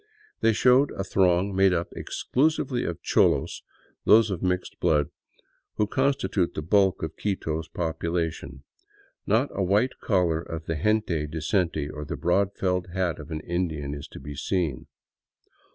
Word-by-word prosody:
They 115 - +4
show 125 +5 +5
a 100 - -5
throng 95 0 +2
made 95 -1 +4
up 85 -1 -1
exclusively 140 -3 0
of 85 - -5
cholos, - - +2 0.4
those 110 0 +5
of 90 - -3
mixed 90 -1 -2
blood, 75 -2 +2 0.6
who 105 - +2
constitute 135 -6 0
the 75 - -3
bulk 95 +1 +2
of 80 - -4
Quito's 80 -6 -2
population. 80 -4 -3 0.6
Not - - +2
a 100 - -2
white 100 +7 +1
collar 90 -5 +1
of 80 -1 -7
the 80 - -2
gente 105 -8 +1
decente 80 0 -1
or 75 - -6
the - - -5
broad 95 +3 +1
felt 90 -1 -1
hat 90 -2 -1
of 75 0 -9
an 80 -2 -4
Indian 80 -5 -2
is 70 -1 -7
to - - -11
be 70 +2 -8
seen. 80 -1 -2
90 Hz, 150 wpm, -26 LUFS, 80-100 Hz, 0.6 s, show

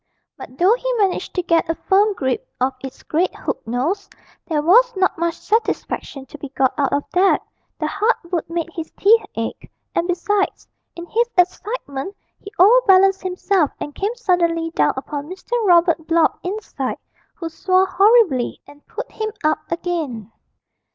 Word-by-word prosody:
But 255 - -11
though 370 +7 +5
he - - -2
managed 400 -6 -1
to 360 - 0
get 335 -1 +1
a 330 - +1
firm 410 +4 +2
grip 295 - -2
of 260 +1 +1
its 265 -1 -9
great 340 +4 0
hook - - -4
nose, 295 - -2 0.4
there 300 -3 0
was 485 +9 +5
not 375 0 +1
much 340 0 -1
satisfaction 420 -10 -2
to 290 +3 -12
be 285 - -7
got 265 -1 +1
out 285 -2 0
of 285 - 0
that 375 +2 +3 0.3
the - - -2
hard 450 +3 +1 0.2
wood 335 -3 -2
made 335 0 -3
his 325 -2 -6
teeth 445 +3 +5
ache, 225 0 -5 0.2
and 340 - 0
besides, 390 +3 -1 0.3
in 340 - -7
his 470 +6 0
excitement 360 - -1 0.2
he 400 - -11
overbalanced 390 -2 +5
himself 370 -3 0
and 295 - -6
came 410 +8 -2
suddenly 340 -7 0
down - - +2
upon 285 +2 -5
Mr. 375 +5 -11
Robert 340 -3 +3
Blott 330 -1 +2
inside, 365 -9 -4 0.4
who 335 - -5
swore 370 +3 +2
horribly 385 - +3
and 290 0 -17
put - - -7
him 435 0 -4
up 310 +1 -1
again. 310 - -3
350 Hz, 165 wpm, -20 LUFS, 305-400 Hz, 0.4 s, though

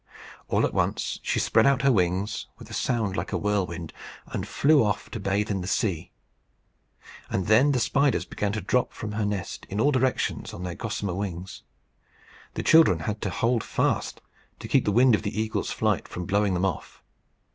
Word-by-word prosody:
All - - +2
at - - -3
once - - -1
she - - -1
spread - - +3
out 140 -1 +2
her 135 - +5
wings, 95 0 0
with - - -13
a - - -7
sound 110 -6 -1
like 85 - -3
a - - 0
whirlwind, 90 -5 -2 0.3
and - - -5
flew 150 -2 +4
off 100 -3 -2
to 110 - -5
bathe 100 +2 -1
in 95 -2 -1
the 90 - -5
sea; 95 -4 -1 1.2
and 95 - -1
then 115 +9 +5
the 130 - +1
spiders 135 -6 +1
began 105 0 -2
to 105 - -2
drop 125 +4 0
from 105 - -6
her 105 -2 -1 0.3
in 100 - -3
all 145 +6 +4
directions 130 -2 -1
on 90 - -7
their 90 -1 -4
gossamer 100 -2 -3
wings. 95 -1 -5 0.9
The - - -3
children 130 - +5
had 105 +5 -3
to 95 - -1
hold 115 +4 0
fast - - -1 0.4
to - - -8
keep - - +2
the 105 - +2
wind 125 +3 +5
of 105 - +2
the 110 0 -3
eagle's 110 0 -2
flight - - 0
from 90 - -6
blowing 100 0 +1
them 90 +2 +1
off. 90 -6 -4
105 Hz, 190 wpm, -26 LUFS, 95-115 Hz, 1.2 s, her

